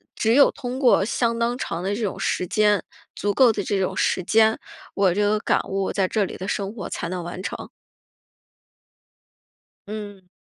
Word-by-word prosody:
只 225 +1 +2
有 280 +2 +6
通 255 -2 -5
过 250 -7 +4
相 235 0 0
当 240 +1 0
长 170 -8 -4
的 200 +2 -1
这 230 - -5
种 195 -2 -3
时 185 - -1
间、 210 +2 +2 0.3
足 205 0 -1
够 250 -4 +5
的 205 - -3
这 200 0 -1
种 185 - -1
时 185 - +1
间， 220 +2 +4 0.3
我 190 -3 +2
这 205 - 0
个 210 +1 +2
感 - - +1
悟 195 0 -1
在 195 -2 +1
这 215 -3 +1
里 - - -7
的 190 +2 -5
生 200 +1 -2
活 225 - -6
才 170 - -4
能 180 -1 -4
完 175 +2 -6
成。 - - -6 2.2
嗯。 205 -3 -8
205 Hz, 200 characters per minute, -23 LUFS, 190-225 Hz, 2.2 s, 有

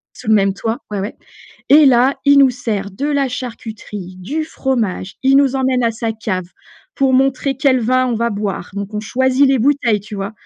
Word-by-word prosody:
sous 235 - -10
le 220 - +5
même 195 -2 +2
toit, 225 +4 -3
ouais, 205 -2 -3
ouais. 205 +4 -5 0.5
Et 295 +1 +7
là, 260 +1 +4
il 285 0 +6
nous 275 -2 +6
sert 220 -5 -4
de 235 +9 -4
la 285 -2 0
charcuterie, 220 -6 -7
du 290 - -3
fromage. 235 - -2
Il 270 +1 +4
nous 275 -1 +3
emmène 260 -1 +1
à 230 - +2
sa 225 0 -3
cave 200 -5 -4 0.5
pour 270 -1 +1
montrer 270 +1 +1
quel 265 -1 +2
vin 255 +3 +1
on 245 - -1
va 235 +1 0
boire, 200 -3 -4
donc 200 +1 -5
on 210 - -3
choisit 260 +5 +2
les 270 -1 +2
bouteilles, 245 -5 +2
tu 205 +1 -9
vois? 195 +2 -4
240 Hz, 205 wpm, -17 LUFS, 210-270 Hz, 0.5 s, Et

